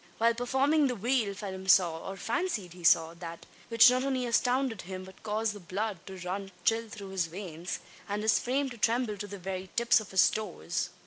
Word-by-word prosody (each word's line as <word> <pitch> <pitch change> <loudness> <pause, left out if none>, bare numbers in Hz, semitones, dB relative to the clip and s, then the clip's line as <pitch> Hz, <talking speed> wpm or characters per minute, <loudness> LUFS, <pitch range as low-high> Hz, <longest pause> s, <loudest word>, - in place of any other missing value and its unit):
While 230 +1 +4
performing 270 +5 +2
the 250 - -1
wheel, 230 -2 0
Phelim 190 -2 -6
saw 175 -3 +5
or 195 - -6
fancied 225 - -2
he 180 -1 -13
saw 165 0 +5
that, 170 -1 -9 0.2
which 230 +1 +8
not 255 +1 +1
only 260 -2 0
astounded 245 -1 +1
him, 185 +1 -7
but 190 0 -14
caused 215 0 -1
the 205 - -9
blood 195 +2 -3
to 190 -1 -8
run 190 +2 -4
chill 225 0 +1
through 205 -3 -8
his 190 -3 -1
veins, 175 -1 -6 0.3
and 205 +1 -2
his 220 - +4
frame 270 +3 0
to 240 - -10
tremble 230 -1 +1
to 205 +1 -5
the 200 0 -7
very 190 0 -5
tips 235 0 +4
of 215 - -9
his 190 - +5
toes. 215 0 -3
210 Hz, 205 wpm, -30 LUFS, 190-235 Hz, 0.3 s, which